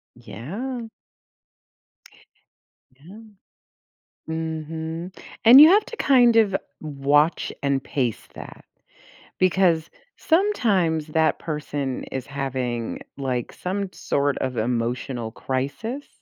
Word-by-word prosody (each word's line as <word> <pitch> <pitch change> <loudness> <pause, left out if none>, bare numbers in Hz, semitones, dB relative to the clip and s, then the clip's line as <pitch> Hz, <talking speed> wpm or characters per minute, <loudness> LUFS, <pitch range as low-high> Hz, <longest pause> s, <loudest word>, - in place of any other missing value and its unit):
Yeah. 225 - -6 2.1
Yeah. 185 +9 -13 1.1
Mhm. 160 +2 -5 0.3
And 245 +4 +10
you 310 - +11
have 410 +4 +5
to 465 - -9
kind 245 - +4
of 205 -4 +4 0.2
watch 145 +1 +1
and 140 -1 0
pace 125 -6 -2
that - - -11 0.7
because 180 -3 +2 0.3
sometimes 205 - +1
that 160 +1 +1
person 145 -4 -4
is 130 -1 -6
having, 130 -4 -3 0.2
like, 125 -3 -3
some 190 +1 -4
sort 140 -1 -1
of 130 -2 -3
emotional 120 0 -2
crisis, 140 - -4
160 Hz, 90 wpm, -23 LUFS, 135-195 Hz, 2.1 s, you